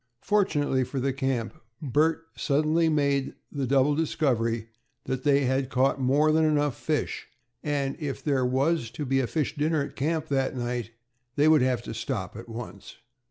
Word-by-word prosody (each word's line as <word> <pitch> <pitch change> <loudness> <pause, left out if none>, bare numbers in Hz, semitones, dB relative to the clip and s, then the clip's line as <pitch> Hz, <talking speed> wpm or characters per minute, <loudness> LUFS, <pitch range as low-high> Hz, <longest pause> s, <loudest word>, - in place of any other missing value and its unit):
Fortunately 145 -10 +2
for 135 +2 -4
the 135 +1 0
camp, 130 -4 -1 0.3
Bert 155 +4 +1
suddenly 155 +3 +2
made 140 -3 +1 0.2
the 140 -3 -2
double 135 +2 +3
discovery 120 -8 0 0.3
that 130 -1 -3
they 145 -1 +4
had 130 +1 0 0.3
more 140 +4 +3
than 160 +1 +3
enough 145 -4 +2
fish, 155 -2 -2 0.3
and 140 -2 -1
that 170 - -16
if 140 -2 -4
there 140 -4 +1
was 130 +1 +1
to 145 +5 -5
be 135 0 +1
a 130 - 0
fish 155 0 -1
dinner 150 0 +1
at - - -8
camp 155 +3 -1
that 135 -1 0
night, 120 -2 -3 0.5
they 150 +1 +4
would 155 -3 +6
have 125 -2 +1
to - - -6
stop 105 -9 -4
at 115 +2 -9
once. 115 -3 -8
140 Hz, 170 wpm, -27 LUFS, 130-150 Hz, 0.5 s, would